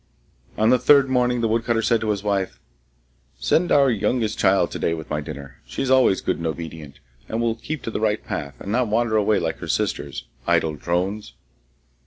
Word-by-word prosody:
On 110 +2 +3
the 125 - +4
third 140 0 +5
morning 125 -1 +2
the 115 - +2
woodcutter 115 +1 0
said 115 0 +2
to 110 - -2
his 100 -1 -1
wife, 100 -2 -1 0.8
'Send 160 - +1
our 140 -2 +5
youngest 110 0 -1
child 95 -3 +3
to - - -5
day 85 - 0
with 80 -1 -9
my 75 0 -1
dinner. 70 -4 -9
She 65 - -4
is 130 - -1
always 130 -7 +4
good - - -1
and 85 - -3
obedient, 80 -3 -7 0.3
and 110 - -2
will 115 -1 +1
keep 135 +6 -6
to 115 - -4
the - - -3
right 110 -1 0
path, 70 -2 -5
and 100 - -6
not 125 +2 +1
wander 110 +1 +1
away 105 0 +3
like - - -2
her - - -7
sisters, - - -2 0.2
idle 80 -1 +2
drones! 90 +7 -2
110 Hz, 205 wpm, -22 LUFS, 85-120 Hz, 0.8 s, third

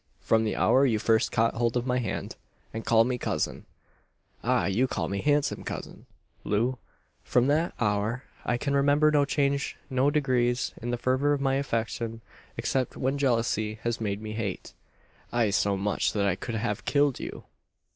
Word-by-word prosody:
From 110 0 +2
the 105 - -1
hour 135 - +4
you 120 -5 +3
first 110 +1 +2
caught 115 +1 +2
hold 120 +1 0
of 120 - -1
my 125 0 +1
hand, 110 -5 -4 0.4
and 110 0 -4
called 115 0 +4
me 125 -1 -2
cousin - - -2 0.8
ah! - - +2
you 105 +8 +2
called - - -3
me 100 0 -2
handsome 145 -1 +1
cousin, - - -7 0.4
Loo 120 +5 0 0.4
from 125 0 +2
that 155 +5 +1
hour 110 +3 0 0.2
I 120 - 0
can 140 +3 -2
remember 145 +2 +4
no 145 -1 +4
change, 140 -1 0
no 130 +2 +3
degrees, 125 -4 +1
in 120 - -4
the 120 - 0
fervour 130 +4 +2
of 145 - 0
my 135 -1 +2
affection; 115 -3 -2 0.4
except 130 -2 -1
when 135 +2 -1
jealousy 115 -5 +1
has 120 -1 -1
made 105 -1 -2
me 110 0 -5
hate 110 -4 -4 0.6
ay, 115 -3 +2
so 100 0 +1
much, 100 +1 0
that 100 -2 +1
I 95 -3 +2
could 115 +4 -5
have 105 -2 -2
killed 145 -2 +2
you!" - - -7
120 Hz, 175 wpm, -27 LUFS, 110-140 Hz, 0.8 s, hour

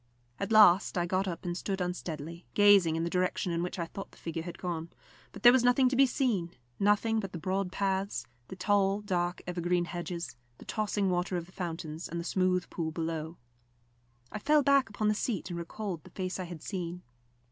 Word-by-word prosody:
At 200 - -3
last 205 -3 +6
I 175 - +2
got 185 +2 0
up 175 -1 -5
and 175 -1 -2
stood 190 +2 -3
unsteadily, 170 -2 -5
gazing 200 -6 +6
in 165 - -1
the 170 - -1
direction 180 0 0
in 170 0 0
which 180 +1 -3
I 170 - -1
thought 195 +4 -8
the - - -20
figure 165 -1 -4
had 175 +1 -7
gone; 170 -2 -4 0.4
but - - -11
there 240 - +10
was 255 -1 +4
nothing 250 +1 +5
to 255 - -1
be 270 +1 +6
seen 220 - 0 0.2
nothing 210 +2 +3
but 195 -4 -5
the - - -4
broad 185 +2 -1
paths, 190 - -1 0.2
the - - -8
tall, 200 +1 +2
dark 180 -3 -1
evergreen 175 0 0
hedges, 175 -4 -5 0.2
the - - -13
tossing 205 -3 0
water 180 +1 0
of 170 - -4
the 180 - -18
fountains 165 -3 -5
and 170 - -3
the - - -3
smooth 180 0 +1
pool 165 -2 -2
below. 160 0 -4 0.9
I - - -4
fell 300 +4 +4
back 275 -3 +4
upon 215 0 -1
the 210 - +4
seat 210 -3 -2
and 170 - -3
recalled 170 -1 -5
the - - -13
face 185 0 -4
I 185 - -3
had 170 -3 -9
seen. 180 -2 -4
180 Hz, 210 wpm, -30 LUFS, 170-205 Hz, 0.9 s, there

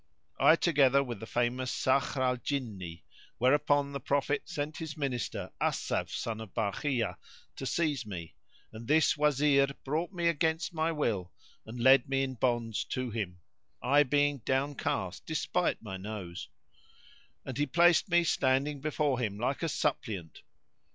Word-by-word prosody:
I 160 - +7
together 140 -5 +4
with 120 -6 -6
the 110 - -8
famous 125 +1 0
Sakhr 135 +1 +1
al 125 -1 +2
Jinni;"[FN#71] 105 - -4 0.3
whereupon 140 +2 +3
the 140 - -4
Prophet 145 +1 0
sent 155 -2 -3
his 160 -3 -6
minister, 130 -6 -3
Asaf - - 0
son 110 -1 -4
of 110 -4 -10
Barkhiya, 115 +2 -1 0.4
to 135 - -5
seize 150 -6 0
me; 90 -6 -7 0.4
and 110 +1 -9
this 155 +1 +4
Wazir 145 -1 +3 0.2
brought 160 +6 -2
me 175 -3 -1
against 160 +1 0
my 160 0 0
will 110 - -1 0.4
and 120 +2 -7
led 130 +1 +5
me 135 0 +1
in 130 -1 -2
bonds 120 -3 0
to 130 -2 -3
him 95 -6 -4 0.4
(I 140 +3 +4
being 145 0 +2
downcast 135 +4 -2
despite - - 0
my 95 -3 -5
nose) 95 -3 -7 1.0
and 130 - -5
he 145 - +2
placed 175 +6 +4
me 175 0 +4
standing 140 -1 +1
before 150 -3 0
him 105 -5 -2
like 125 +5 -1
a 165 - 0
suppliant. 110 - -2
135 Hz, 150 wpm, -30 LUFS, 115-145 Hz, 1.0 s, I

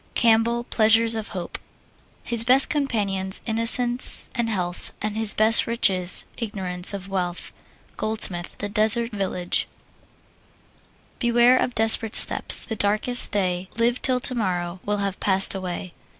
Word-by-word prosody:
CAMPBELL, 235 +1 0
Pleasures 225 0 +1
of 220 -1 -5
Hope. 180 -4 -8 0.6
His 235 -1 +6
best 260 +3 +3
companions, 200 -10 -3
innocence 240 +2 +4
and 235 -2 -3
health, 180 -4 -5
And 215 0 -6
his 220 -1 +1
best 220 +1 +3
riches, 185 -6 0
ignorance 190 -5 -2
of 195 -1 -9
wealth. 180 -2 -6 0.4
GOLDSMITH, 205 -5 0
The 205 - -5
Deserted 220 +3 0
Village. 185 -3 -3 1.5
Beware 240 +1 +2
of 250 - -4
desperate 225 0 +1
steps! - - +5
The 225 - -6
darkest 215 +4 +1
day, 185 -2 -3
Live 235 +2 -1
till 255 -1 0
tomorrow, 185 -8 -3
will 205 0 -2
have 195 -1 -6
passed 195 -1 +3
away. 185 -1 -8
215 Hz, 130 wpm, -21 LUFS, 190-235 Hz, 1.5 s, His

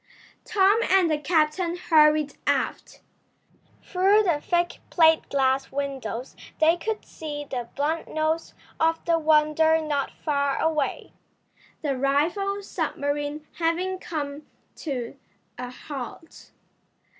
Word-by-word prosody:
Tom 410 0 +4
and 370 -3 +4
the 300 - +1
captain 325 +3 +1
hurried 305 -4 +4
aft. - - -1 0.8
Through 395 +3 +3
the 335 -7 +1
thick 345 +1 0
plate 320 -2 +4
glass 270 -1 +1
windows 265 -4 -4 0.2
they 320 +2 +5
could 430 +5 -4
see 295 -2 -6
the 245 -4 -5
blunt 310 +3 -1
nose 315 +1 -1 0.2
of 325 0 +1
the 335 -1 +2
Wonder 315 +1 +4
not 295 -3 -1
far 280 -2 -1
away, 310 -3 -1 0.7
the 280 -3 0
rival 345 +10 0
submarine 290 -3 -3
having 355 +3 0
come 295 -3 -5 0.3
to 265 -4 -4 0.4
a 250 0 -4
halt. 275 +4 -9
310 Hz, 110 wpm, -25 LUFS, 285-335 Hz, 0.8 s, they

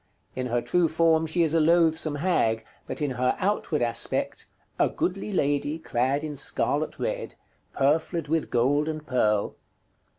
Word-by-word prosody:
In 130 -1 -3
her 120 0 -1
true 170 +6 +2
form 160 0 +3
she 170 +2 +3
is 160 -1 +1
a 165 - +4
loathsome 160 -1 +3
hag, 115 -9 +1 0.2
but - - -4
in 145 - 0
her 125 0 0
outward 185 -8 0
aspect, 120 -1 -1 0.3
"A - - +4
goodly 195 +3 -2
lady, 145 -3 0
clad 135 -1 -1
in 155 -1 -4
scarlot - - -1
red, - - -3 0.4
Purfled 160 +4 +1
with 160 +1 0
gold 145 +6 +2
and 155 -1 -5
pearle 105 -7 +1
150 Hz, 155 wpm, -26 LUFS, 130-165 Hz, 0.4 s, a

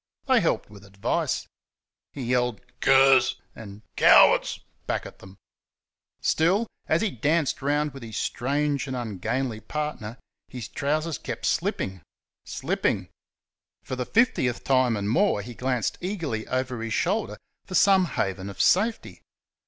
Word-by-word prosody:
They - - +4
helped - - 0
with 100 -1 -14
advice. 100 0 -2 0.7
He 135 - -6
yelled 125 -2 0 0.2
"Curs!" 135 -1 +5 0.2
and 105 -1 -11
"Cowards!" - - +5 0.3
back - - -2
at - - -11
them. 95 +1 -14 0.8
Still, 185 +8 +2 0.2
as 160 +5 +2
he 215 - 0
danced 150 +4 0
around 145 +1 0
with 135 - -10
his 110 -2 -7
strange 140 +2 -1
and 130 - -4
ungainly 120 +1 -3
partner, 140 -5 -5 0.3
his 125 -4 -7
trousers 155 +2 -2
kept - - -5
slipping 95 -2 -1 0.4
slipping. - - -2 0.7
For 130 - -5
the 125 -1 -4
fiftieth 205 - +1
time 130 -4 +2
and 100 0 -3
more 140 - +2
he 120 +3 -8
glanced 125 -1 -2
eagerly 165 - -3
over 130 -2 -2
his 115 -1 -2
shoulder 205 +5 -1 0.3
for 185 - -5
some 190 0 +5
haven 95 - -3
of 100 -1 -10
safety. 220 - +1
130 Hz, 135 wpm, -25 LUFS, 110-150 Hz, 0.8 s, Curs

